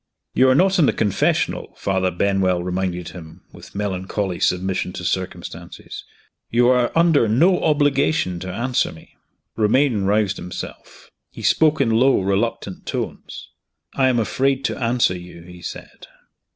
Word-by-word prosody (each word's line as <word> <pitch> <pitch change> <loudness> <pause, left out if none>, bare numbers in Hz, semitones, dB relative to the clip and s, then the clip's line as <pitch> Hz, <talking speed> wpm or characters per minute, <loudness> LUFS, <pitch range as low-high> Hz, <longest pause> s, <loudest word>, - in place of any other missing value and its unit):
"You 130 0 +4
are 130 - +4
not 190 +4 +3
in 150 - +5
the - - +2
confessional," 100 -3 0
Father 95 -1 0
Benwell 95 -1 +1
reminded 90 -1 -3
him, 80 -3 -12
with - - -14
melancholy 95 -1 -3
submission 90 0 0
to 90 - -6
circumstances. 90 -1 -5 0.4
"You 120 +1 +3
are 125 -1 +3
under 165 -7 +4
no 170 - +3
obligation 145 - +1
to 95 +1 -6
answer 120 +6 0
me." 80 - -16 0.4
Romayne 110 -1 +2
roused 100 0 +1
himself. 90 - -9 0.2
He - - -11
spoke 155 -1 +3
in 125 -5 +2
low, 130 +4 +4
reluctant 100 +1 -2
tones. - - -5 0.4
"I 135 -1 +2
am 125 - +1
afraid 135 +4 0
to 130 - -2
answer 115 -5 +2
you," 90 -1 -11
he 90 0 -13
said. - - -9
105 Hz, 145 wpm, -21 LUFS, 90-130 Hz, 0.4 s, in